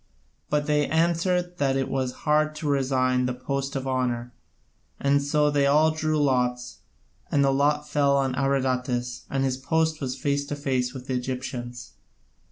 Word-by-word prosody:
But 150 Hz, 0 st, +1 dB
they 150 Hz, -1 st, +2 dB
answered 175 Hz, +2 st, +1 dB
that 135 Hz, -2 st, +2 dB
it 135 Hz, -, -1 dB
was 130 Hz, -2 st, -1 dB
hard 155 Hz, 0 st, +2 dB
to 155 Hz, 0 st, -4 dB
resign 130 Hz, -2 st, +1 dB
the 125 Hz, -, -2 dB
post 140 Hz, +2 st, -3 dB
of 135 Hz, -1 st, -3 dB
honour, 125 Hz, -2 st, -1 dB, 0.7 s
and 140 Hz, 0 st, +2 dB
so 150 Hz, +1 st, +2 dB
they 140 Hz, -1 st, +2 dB
all 155 Hz, +3 st, +4 dB
drew 155 Hz, -1 st, 0 dB
lots, 125 Hz, -3 st, 0 dB, 0.5 s
and 140 Hz, -, +3 dB
the 135 Hz, -, +3 dB
lot 150 Hz, +2 st, +1 dB
fell 140 Hz, -2 st, +2 dB
on 135 Hz, -2 st, 0 dB
Abradatas, 125 Hz, -2 st, -1 dB
and 135 Hz, 0 st, 0 dB
his 130 Hz, -1 st, 0 dB
post 160 Hz, +3 st, 0 dB
was 130 Hz, -1 st, -3 dB
face 140 Hz, -1 st, 0 dB
to 145 Hz, -, -3 dB
face 130 Hz, -3 st, -1 dB
with 130 Hz, -1 st, -9 dB
the 130 Hz, -, -3 dB
Egyptians. 125 Hz, -1 st, -5 dB
140 Hz, 170 wpm, -25 LUFS, 130-150 Hz, 0.7 s, all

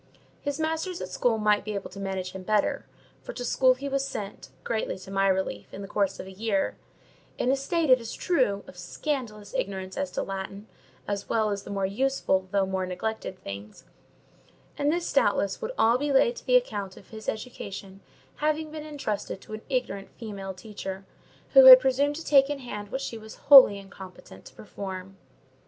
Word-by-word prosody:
His 285 Hz, 0 st, -3 dB
masters 320 Hz, +3 st, -2 dB
at 185 Hz, -, -5 dB
school 230 Hz, +3 st, +1 dB
might 210 Hz, -1 st, +2 dB
be 210 Hz, 0 st, -4 dB
able 195 Hz, -1 st, -5 dB
to 195 Hz, -, -10 dB
manage 190 Hz, -2 st, -3 dB
him 190 Hz, -, -8 dB
better—for 210 Hz, +2 st, -3 dB
to 245 Hz, +1 st, -5 dB
school 255 Hz, +1 st, +4 dB
he 275 Hz, +2 st, -6 dB
was 275 Hz, 0 st, 0 dB
sent, 205 Hz, -7 st, -6 dB
greatly 220 Hz, -4 st, -2 dB
to 190 Hz, +1 st, -11 dB
my 195 Hz, 0 st, +2 dB
relief, 190 Hz, -, -1 dB
in 200 Hz, -, -7 dB
the -, -, -7 dB
course 195 Hz, -1 st, 0 dB
of -, -, -6 dB
a 190 Hz, -, -10 dB
year; 200 Hz, 0 st, -1 dB, 0.6 s
in 250 Hz, -, +1 dB
a -, -, +3 dB
state, 300 Hz, +2 st, 0 dB
it 255 Hz, -1 st, +6 dB
is 230 Hz, -, -6 dB
true, 250 Hz, -, +1 dB
of 180 Hz, -, -13 dB
scandalous 210 Hz, -, -4 dB
ignorance 190 Hz, -1 st, -3 dB
as 190 Hz, -, -1 dB
to -, -, -1 dB
Latin, 195 Hz, +1 st, -6 dB, 0.4 s
as 200 Hz, -1 st, -3 dB
well 220 Hz, -2 st, +1 dB
as 200 Hz, -1 st, -2 dB
the -, -, -11 dB
more 195 Hz, -1 st, -1 dB
useful 200 Hz, -3 st, 0 dB
though 200 Hz, 0 st, +2 dB
more 190 Hz, -1 st, -2 dB
neglected 190 Hz, +1 st, -4 dB
things: 100 Hz, +2 st, -8 dB, 0.9 s
and 290 Hz, +1 st, +1 dB
this, 345 Hz, +5 st, -2 dB
doubtless, -, -, +2 dB
would 460 Hz, +1 st, -3 dB
all 235 Hz, +2 st, +4 dB
be 290 Hz, +1 st, -1 dB
laid 470 Hz, -, +4 dB
to -, -, -10 dB
the -, -, +4 dB
account 205 Hz, -, 0 dB
of -, -, -15 dB
his 220 Hz, -1 st, -6 dB
education 200 Hz, -4 st, -7 dB, 0.4 s
having 310 Hz, +1 st, -1 dB
been 310 Hz, 0 st, -6 dB
entrusted 245 Hz, -10 st, -4 dB
to -, -, -11 dB
an 215 Hz, -, -6 dB
ignorant 245 Hz, -7 st, -2 dB
female 200 Hz, -4 st, -6 dB
teacher, 195 Hz, -1 st, -7 dB, 0.5 s
who -, -, +9 dB
had -, -, +13 dB
presumed 285 Hz, -, +1 dB
to 325 Hz, -, -7 dB
take 275 Hz, -1 st, +5 dB
in 290 Hz, -, -2 dB
hand 210 Hz, -6 st, -7 dB
what 265 Hz, -, -3 dB
she 230 Hz, -4 st, -5 dB
was 220 Hz, 0 st, -11 dB
wholly 265 Hz, -8 st, +8 dB
incompetent 195 Hz, -1 st, -12 dB
to -, -, -14 dB
perform. 190 Hz, -2 st, -7 dB
215 Hz, 195 wpm, -27 LUFS, 195-275 Hz, 0.9 s, had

